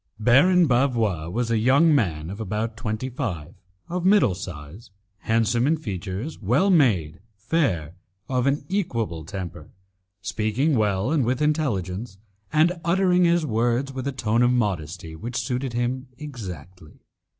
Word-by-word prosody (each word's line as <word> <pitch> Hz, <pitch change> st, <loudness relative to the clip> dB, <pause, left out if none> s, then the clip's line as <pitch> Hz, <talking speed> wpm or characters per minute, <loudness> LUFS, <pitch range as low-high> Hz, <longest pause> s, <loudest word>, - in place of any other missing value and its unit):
Baron 145 Hz, +11 st, +5 dB
Bavois 115 Hz, -, +1 dB
was 115 Hz, +3 st, -1 dB
a 115 Hz, -, +2 dB
young 140 Hz, +8 st, +4 dB
man 85 Hz, -, 0 dB
of 100 Hz, -, -7 dB
about 110 Hz, +2 st, -3 dB
twenty 110 Hz, +1 st, -3 dB
five, 95 Hz, -, -4 dB, 0.3 s
of 175 Hz, 0 st, -3 dB
middle 190 Hz, -, +4 dB
size, 85 Hz, +3 st, -9 dB, 0.3 s
handsome 115 Hz, +3 st, +1 dB
in 160 Hz, +2 st, +2 dB
features, 105 Hz, -, -5 dB
well 125 Hz, -, +2 dB
made, 95 Hz, -, +2 dB, 0.2 s
fair, 100 Hz, -, -1 dB, 0.3 s
of 130 Hz, 0 st, 0 dB
an 140 Hz, +2 st, 0 dB
equable 115 Hz, -, -2 dB
temper, 85 Hz, -3 st, -7 dB, 0.5 s
speaking 110 Hz, +9 st, 0 dB
well 105 Hz, +1 st, +1 dB
and 155 Hz, -4 st, +2 dB
with 125 Hz, +2 st, 0 dB
intelligence, 115 Hz, -, -1 dB, 0.3 s
and 165 Hz, +3 st, +2 dB
uttering 180 Hz, +1 st, +3 dB
his 170 Hz, -1 st, +2 dB
words 120 Hz, +2 st, 0 dB
with 130 Hz, 0 st, -4 dB
a -, -, 0 dB
tone 115 Hz, -3 st, 0 dB
of 120 Hz, -, +4 dB
modesty 90 Hz, -8 st, -2 dB
which 115 Hz, +9 st, -5 dB
suited 125 Hz, +1 st, -2 dB
him 125 Hz, +2 st, -2 dB
exactly. 95 Hz, -, -9 dB
120 Hz, 140 wpm, -24 LUFS, 95-140 Hz, 0.5 s, Baron